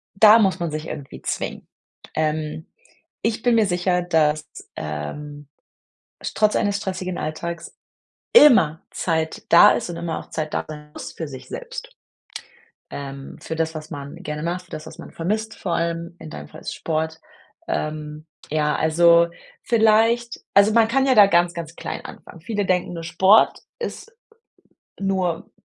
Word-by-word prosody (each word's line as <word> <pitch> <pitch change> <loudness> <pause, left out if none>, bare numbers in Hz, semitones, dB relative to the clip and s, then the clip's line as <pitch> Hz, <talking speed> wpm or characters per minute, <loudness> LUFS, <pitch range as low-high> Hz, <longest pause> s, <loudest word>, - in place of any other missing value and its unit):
da 215 +2 +8
muss 190 -3 +2
man 170 -2 -2
sich 155 +1 -5
irgendwie 140 -2 -8
zwingen. - - -4 0.5
Ähm, 155 0 -2 0.6
ich 225 0 -1
bin 240 -1 +4
mir 220 - +4
sicher, 180 -1 +1
dass, 155 -3 +1 0.3
ähm, 140 - -6 0.9
trotz 215 -1 +3
eines 205 -1 +1
stressigen 185 -2 -4
Alltags 170 +2 -5 0.6
immer 190 - +7
Zeit 160 -2 -2
da 170 - +8
ist - - -1
und 170 - -5
immer 170 -2 -3
auch - - -12
Zeit 155 -1 -4
da - - -1
sein 150 -1 -9
muss - - -8
für 160 - -5
sich 130 -2 -10
selbst. - - -8 1.0
Ähm, 135 -1 -7
für 160 - -5
das, 160 0 -1
was 155 0 -8
man 140 0 -7
gerne 150 0 -5
macht, 175 +2 -2
für - - -27
das, 155 - -7
was - - -11
man - - -10
vermisst 215 +6 -2
vor 175 - -2
allem, 170 0 -2
in 155 - -10
deinem 75 - -8
Fall - - -12
ist - - -8
es - - -3
Sport. 160 0 -3 0.5
Ähm, 155 0 -4 0.2
ja, 150 0 +1
also 170 +1 +5 0.3
vielleicht 230 +1 +3
also 200 +2 +5
man 225 0 +4
kann 270 +3 +2
ja 260 - +4
da 210 -3 +8
ganz 175 -2 +3
ganz 170 -1 -7
klein - - -6
anfangen. 165 - -11
Viele 205 +3 -2
denken 180 -1 0
nur 165 -1 -6
Sport 190 +6 +4 0.2
ist 460 -1 -6 0.9
nur 190 -4 -1
170 Hz, 165 wpm, -22 LUFS, 155-200 Hz, 1.0 s, da